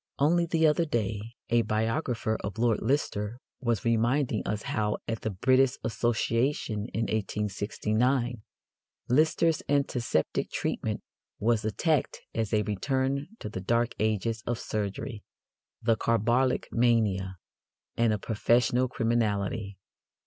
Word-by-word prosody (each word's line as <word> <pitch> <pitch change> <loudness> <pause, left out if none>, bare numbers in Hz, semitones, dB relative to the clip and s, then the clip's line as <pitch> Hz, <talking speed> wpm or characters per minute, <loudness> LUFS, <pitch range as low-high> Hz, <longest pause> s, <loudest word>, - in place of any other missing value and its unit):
Only 170 +4 +3
the 160 -1 +2
other 155 +2 +3
day 110 -8 -1 0.3
a 120 0 +5
biographer 115 +1 0
of 100 -1 -4
Lord 115 -1 +2
Lister 120 -5 -1 0.2
was 120 -4 -1
reminding 115 +1 +2
us 105 +1 -2
how, 105 -1 -1
at 115 -1 -3
the - - -1
British 130 +6 +3
Association 115 -1 0
in 110 - -2
1869, 110 +3 0 0.7
Lister's 155 +3 +3
antiseptic 130 - 0
treatment - - -2 0.4
was 115 0 +2
attacked 150 +8 0
as 110 -2 -1
a 105 -1 +2
"return 130 +7 -1
to - - -6
the 100 -3 -5
dark 115 +4 +1
ages 110 +1 0
of 120 -1 0
surgery," 105 +2 -4 0.6
the 115 0 +4
"carbolic 120 +4 +1
mania," 105 -6 +2 0.6
and 115 -1 +3
"a 105 - +1
professional 120 +4 +2
criminality." 105 -4 -1
115 Hz, 120 wpm, -28 LUFS, 105-130 Hz, 0.7 s, a